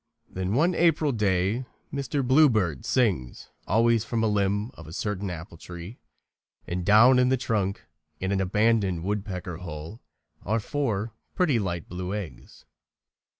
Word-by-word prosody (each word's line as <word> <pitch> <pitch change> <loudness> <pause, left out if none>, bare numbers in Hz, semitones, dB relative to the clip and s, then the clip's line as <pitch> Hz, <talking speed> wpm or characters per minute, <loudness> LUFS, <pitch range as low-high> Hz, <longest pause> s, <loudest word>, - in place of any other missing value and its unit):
Then 95 +3 -3
one 170 +7 +3
April 165 -3 +3
day 105 +2 0 0.3
Mr. 140 -1 -2
Bluebird 115 - +3
sings 95 - 0 0.2
always 115 +1 +3
from 115 0 -1
a - - +3
limb 105 +1 0
of 80 - -12
a 80 - -9
certain 105 0 -3
apple 85 0 -8
tree, 90 +7 -9 0.7
and 90 +1 -3
down 115 +7 +6
in 125 0 +4
the 130 - +3
trunk, 100 -5 -1 0.3
in 95 +1 -2
an 95 -1 +1
abandoned 100 -3 +1
woodpecker's 95 -3 -4
hole, 80 +5 -7 0.4
are 110 +4 0
four 115 -3 -2 0.2
pretty 155 -10 +2
light 85 -5 -3
blue 90 +2 -4
eggs. 100 -6 -8
105 Hz, 145 wpm, -26 LUFS, 90-120 Hz, 0.7 s, down